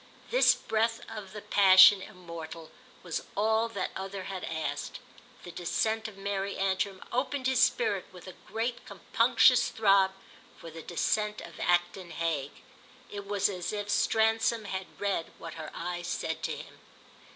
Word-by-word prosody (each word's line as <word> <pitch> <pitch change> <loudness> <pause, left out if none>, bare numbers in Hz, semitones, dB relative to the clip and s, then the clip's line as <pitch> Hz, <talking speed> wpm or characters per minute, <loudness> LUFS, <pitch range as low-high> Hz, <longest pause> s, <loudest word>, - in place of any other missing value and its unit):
This - - +5
breath 225 +1 -1
of 210 -4 -8
the 210 +1 -8
passion 190 -1 +7
immortal 170 -3 -9 0.3
was 170 -3 -3 0.2
all 220 +2 +2
that 200 -5 -3
other 195 0 -5
had 190 -1 -6
asked; 160 -1 -4 0.4
the 175 - -8
descent 220 +6 -1
of 210 -3 -11
Mary 200 0 -3
Antrim 195 0 -1
opened 260 +2 -1
his 260 0 +2
spirit 475 - +2
with - - -13
a - - -9
great 235 +2 -3
compunctious - - +3
throb 195 -3 +4 0.5
for 165 - -10
the 165 +1 -9
descent 210 +6 -1
of - - -11
Acton 175 +1 0
Hague. 160 -4 -3 0.5
It 200 -1 -7
was 200 -1 +2
as 180 -3 -4
if 205 -1 -3
Stransom 225 +1 +2
had 190 -1 -4
read 200 -5 -2
what 165 -1 -8
her 155 -2 -7
eyes 175 +1 -4
said - - -3
to - - -2
him. - - -12
195 Hz, 150 wpm, -29 LUFS, 175-220 Hz, 0.5 s, passion